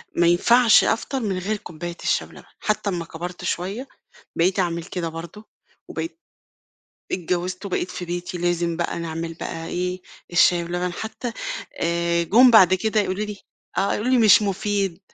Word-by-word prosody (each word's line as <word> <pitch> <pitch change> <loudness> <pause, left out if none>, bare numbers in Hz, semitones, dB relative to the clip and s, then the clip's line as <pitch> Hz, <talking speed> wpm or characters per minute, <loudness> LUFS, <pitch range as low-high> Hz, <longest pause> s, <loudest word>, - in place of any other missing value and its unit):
ما 170 0 +4
ينفعش 230 +7 +6
أفطر 265 +4 0
من 200 -6 -2
غير 205 +4 -2
كوباية 170 -1 -7
الشاي - - +1
بلبن، - - -14 0.2
حتى 210 -1 -1
أمّا 175 -3 -3
كبرت 175 +2 -7
شوية 200 +10 -3 0.5
بقيت 185 +4 +2
أعمل 170 -2 0
كده 180 -2 -4
برضه، 170 +7 -9 0.4
وبقيت 330 0 -5 0.9
اتجوزت، 180 +2 -2
وبقيت 180 -1 -2
في 180 - -5
بيتي 175 +1 -4
لازم 170 -1 0
بقى 170 0 -2
نعمل 165 0 -4
بقى 165 0 -6
إيه، 180 +1 -3 0.3
الشاي 175 0 +4
بلبن. 175 +1 -2
حتى 225 +4 -5 0.5
آآ، 170 0 +1
جُم 240 +9 +6
بعد 190 -5 +7
كده 215 +3 +1
يقولوا 200 +1 -1
لي 210 -1 -6 0.4
آه، 195 +1 +2
يقولوا 235 +5 -1
لي: 255 - +5
"مش 215 -1 +7
مفيد."، 195 -2 -1
180 Hz, 160 wpm, -23 LUFS, 170-210 Hz, 0.9 s, بعد